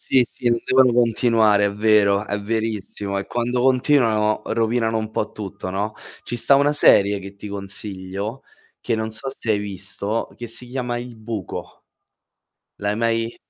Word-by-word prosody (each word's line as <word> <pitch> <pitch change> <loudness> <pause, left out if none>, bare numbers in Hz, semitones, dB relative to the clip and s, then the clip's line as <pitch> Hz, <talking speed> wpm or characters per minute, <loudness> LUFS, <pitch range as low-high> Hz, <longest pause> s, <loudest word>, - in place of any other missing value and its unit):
Sì, 130 -2 +3
sì, 125 - -3
non 120 0 +2
devono 130 -1 +4
continuare, 115 -3 +3
è 100 - -1
vero, 105 -1 +3
è 105 -1 -3
verissimo. 105 -2 -3
E 100 - -3
quando 120 +1 -1
continuano 125 -5 +3
rovinano 115 0 0
un 110 0 -4
po' 110 -1 -2
tutto, 95 -2 -6
no. 105 +3 -2 0.3
Ci 120 - -5
sta 120 +4 +4
una 145 +1 +4
serie 100 -8 +5
che 100 0 -9
ti 100 - -9
consiglio, 100 +3 -5 0.4
che 120 - -2
non 110 0 -1
so 110 +4 -7
se 115 - -7
hai 105 - +4
visto, 100 +2 -3
che 120 - -7
si 120 +2 -7
chiama 125 -1 -3
"Il 120 -1 -8
buco". 110 -3 -7 0.9
L'hai 105 0 -1
mai 115 +1 0
110 Hz, 165 wpm, -22 LUFS, 100-120 Hz, 0.9 s, serie